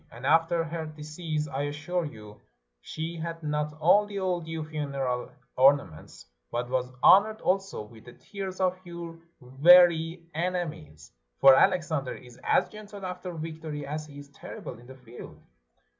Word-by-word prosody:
And 120 +3 -10
after 165 +3 +3
her 165 0 -5
decease, 155 0 -4
I 140 0 -3
assure 150 +4 -3
you, 105 -7 -11 0.4
she 165 +2 -5
had 165 0 -6
not 150 0 -2
only 205 +5 +3
all 185 -2 -1
due 160 -1 -5
funeral 140 -5 -3 0.3
ornaments, 135 - +2 0.2
but 120 +1 -3
was 125 -1 0
honored 215 +3 +6
also 195 - -1
with 110 +1 -16
the 120 - -12
tears 190 +2 -7
of 185 -1 +1
your 170 -1 -8 0.2
very 165 +5 +5
enemies; 155 - -4 0.3
for 135 - +9
Alexander 170 -4 +2
is 125 -1 -14
as - - +3
gentle 205 -2 -10
after 180 0 -6
victory, 155 -2 -6
as 150 +2 -5
he 145 -1 -13
is 145 0 -11
terrible 130 - -9
in 120 - -16
the 130 - -11
field." 125 -2 -12
155 Hz, 150 wpm, -27 LUFS, 135-175 Hz, 0.4 s, for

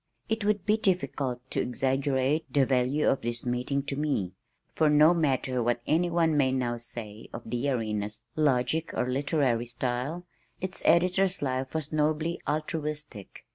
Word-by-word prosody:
It 220 -1 -1
would 205 -2 +1
be 215 +1 +3
difficult 140 - -1
to - - 0
exaggerate 135 +3 0
the 140 -2 +4
value 130 +3 +1
of 135 - +2
this 120 +1 -3
meeting 125 +3 -1
to 140 -1 -4
me, 135 -11 -1 0.4
for 155 - +3
no 150 +3 +6
matter 135 -6 0
what 120 +1 +1
anyone 165 0 +2
may 135 -3 +3
now 120 -2 -1
say 110 -2 -8
of 115 - -7
the 120 +5 -1
Arena's 105 -4 -2
logic 150 +1 +1
or 125 - 0
literary 130 -3 +1
style, 125 +8 -3 0.3
its 185 0 -4
editor's 180 +1 +3
life 130 +1 -2
was 155 -1 -3
nobly 155 +2 0
altruistic. 150 - -4
140 Hz, 150 wpm, -28 LUFS, 125-155 Hz, 0.4 s, no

